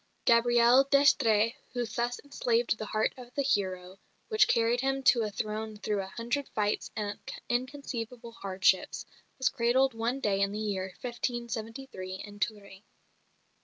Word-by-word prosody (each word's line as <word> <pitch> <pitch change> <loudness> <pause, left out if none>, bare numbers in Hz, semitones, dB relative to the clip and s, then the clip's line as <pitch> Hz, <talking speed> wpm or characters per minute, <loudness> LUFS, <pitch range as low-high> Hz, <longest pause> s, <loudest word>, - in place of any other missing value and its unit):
Gabrielle 240 +2 +5
d'Estrées 230 -6 +4 0.2
who 245 -1 -1
thus 240 +1 -2
enslaved 240 -5 +1
the 215 - -4
heart 215 +1 0
of 250 -1 -12
the 280 - +1
hero, 190 -6 -1 0.3
which 435 -2 +4
carried 235 +1 +2
him 270 0 0
to 240 -2 +5
a 215 - -1
throne 215 +1 -4
through 205 -1 -1
a 190 - -6
hundred 235 +7 -3
fights 210 -1 0
and 205 -1 -3 0.3
inconceivable 245 -2 -3
hardships, 190 -3 +1 0.3
was 260 - +1
cradled 255 +2 +2
one 230 +4 -1
day 200 -6 +1
in 200 0 +2
the - - -3
year 200 -3 -2 0.2
1573 235 -4 -4
in 205 +1 -9
Touraine. 200 -3 -4
230 Hz, 145 wpm, -30 LUFS, 205-250 Hz, 0.3 s, Gabrielle